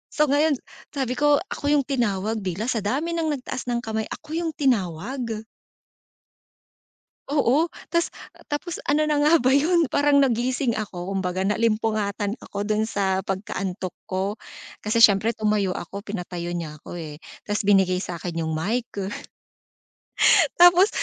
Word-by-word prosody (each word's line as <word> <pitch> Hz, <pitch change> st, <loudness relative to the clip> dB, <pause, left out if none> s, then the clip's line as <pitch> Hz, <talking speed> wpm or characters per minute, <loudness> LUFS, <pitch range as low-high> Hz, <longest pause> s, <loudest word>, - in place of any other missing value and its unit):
So, 300 Hz, -, +4 dB
ngayon 295 Hz, 0 st, +3 dB, 0.4 s
sabi 260 Hz, -2 st, -1 dB
ko 290 Hz, +2 st, +4 dB, 0.2 s
ako 285 Hz, -, -4 dB
'yung 290 Hz, -1 st, +4 dB
tinawag 220 Hz, -5 st, -1 dB
bilang 195 Hz, +6 st, -2 dB
sa 225 Hz, -, 0 dB
dami 275 Hz, -, -1 dB
ng 325 Hz, -2 st, 0 dB
nagtaas 255 Hz, 0 st, -6 dB
ng 240 Hz, 0 st, -1 dB
kamay, 220 Hz, 0 st, -2 dB
ako 300 Hz, -, -9 dB
'yung 330 Hz, 0 st, -1 dB
tinawag. 225 Hz, -, -1 dB, 1.9 s
Oo, 295 Hz, +3 st, +2 dB, 0.2 s
ta's, 340 Hz, 0 st, 0 dB, 0.4 s
tapos 325 Hz, +4 st, -4 dB
ano 305 Hz, +2 st, +2 dB
na 300 Hz, -, +2 dB
nga 300 Hz, +3 st, +5 dB
ba 250 Hz, -, +1 dB
'yun, 330 Hz, +1 st, +3 dB
parang 285 Hz, +1 st, +3 dB
nagising 250 Hz, -1 st, +1 dB
ako 195 Hz, -3 st, -4 dB
kumbaga 185 Hz, 0 st, -1 dB
naalimpungatan 215 Hz, -1 st, 0 dB
ako 205 Hz, -4 st, -6 dB
dun 215 Hz, 0 st, +1 dB
sa 190 Hz, -3 st, 0 dB
pagkaantok 190 Hz, -1 st, -4 dB
ko, 195 Hz, +2 st, -2 dB, 0.5 s
kasi, 220 Hz, +2 st, +1 dB
siyempre 215 Hz, +1 st, +6 dB
tumayo 210 Hz, -4 st, 0 dB
ako, 200 Hz, +3 st, -6 dB
pinatayo 180 Hz, -4 st, -5 dB
niya 165 Hz, -3 st, -4 dB
ako, 175 Hz, -, -7 dB
eh, 150 Hz, -2 st, -7 dB, 0.3 s
ta's 210 Hz, +1 st, -1 dB
binigay 190 Hz, -2 st, +3 dB
sa'kin 175 Hz, -1 st, -5 dB
'yung 160 Hz, -, -2 dB
mic. 215 Hz, +10 st, -2 dB, 1.7 s
Tapos, 355 Hz, +3 st, +7 dB
220 Hz, 140 wpm, -24 LUFS, 195-280 Hz, 1.9 s, Tapos